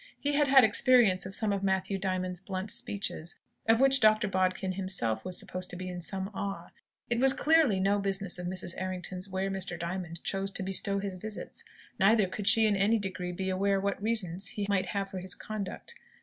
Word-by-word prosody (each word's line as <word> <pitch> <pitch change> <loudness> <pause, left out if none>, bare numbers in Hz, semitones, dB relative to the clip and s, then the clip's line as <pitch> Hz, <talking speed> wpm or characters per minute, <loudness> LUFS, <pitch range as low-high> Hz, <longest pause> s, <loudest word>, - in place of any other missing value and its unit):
He 290 +1 -1
had 290 0 +3
had 270 -1 +7
experience 220 -3 +4
of 190 - -3
some 215 -2 +1
of 200 - -2
Matthew 190 0 0
Diamond's 185 -2 -2
blunt 190 +1 -5
speeches, 195 -5 -4 0.3
of 225 0 +4
which 270 0 +5
Dr. 215 0 +4
Bodkin 185 0 0
himself 185 - -1
was 185 -1 -1
supposed 185 0 -1
to - - -4
be 185 +1 -6
in 180 -1 -6
some 190 +3 -3
awe. 195 -4 -5 0.4
It 235 - +1
was 265 +1 +4
clearly 295 -9 +3
no 200 +2 +2
business 195 -2 -1
of 180 - -4
Mrs. 180 -1 -1
Errington's 185 0 -4
where 190 +1 -2
Mr. 190 -2 -2
Diamond 170 0 -5
chose 195 0 -1
to - - -2
bestow 195 +1 +2
his 200 -1 -3
visits; 210 +3 -7 0.4
neither 210 +1 +4
could 195 +2 -5
she 225 0 +6
in 210 -1 +2
any 200 +4 +3
degree 185 -3 -4
be 190 +1 -3
aware 195 +1 +1
what 200 0 -2
reasons 200 -4 -1
he 205 - -3
might 200 -2 0
have 195 -1 -3
for 190 - -5
his 185 0 -3
conduct. 215 - -6
195 Hz, 205 wpm, -29 LUFS, 185-210 Hz, 0.4 s, had